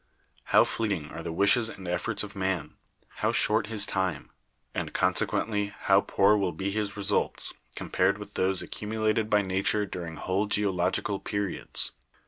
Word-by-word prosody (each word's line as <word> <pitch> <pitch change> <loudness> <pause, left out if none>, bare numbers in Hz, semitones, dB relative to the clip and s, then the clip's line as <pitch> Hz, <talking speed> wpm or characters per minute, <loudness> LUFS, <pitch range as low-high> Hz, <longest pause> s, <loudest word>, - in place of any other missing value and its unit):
How - - +5
fleeting 100 -9 -2
are - - -7
the 85 0 -5
wishes 110 +7 +4
and 95 -4 -9
efforts 90 +6 -1
of 105 0 -8
man! 95 -4 -2 0.4
how - - +1
short - - +2
his 105 -2 +3
time! 95 -7 -2 0.4
and - - -4
consequently 105 -2 0
how 100 0 +4
poor 100 +1 +3
will 100 -4 0
be 95 +5 -3
his 105 0 -3
results, 100 0 +2 0.2
compared - - 0
with - - -10
those 95 0 0
accumulated 110 0 -1
by 105 -1 +3
Nature 95 +2 +1
during 85 -4 -6
whole 95 +6 -1
geological 100 -1 0
periods 100 -2 0
100 Hz, 150 wpm, -27 LUFS, 95-105 Hz, 0.4 s, How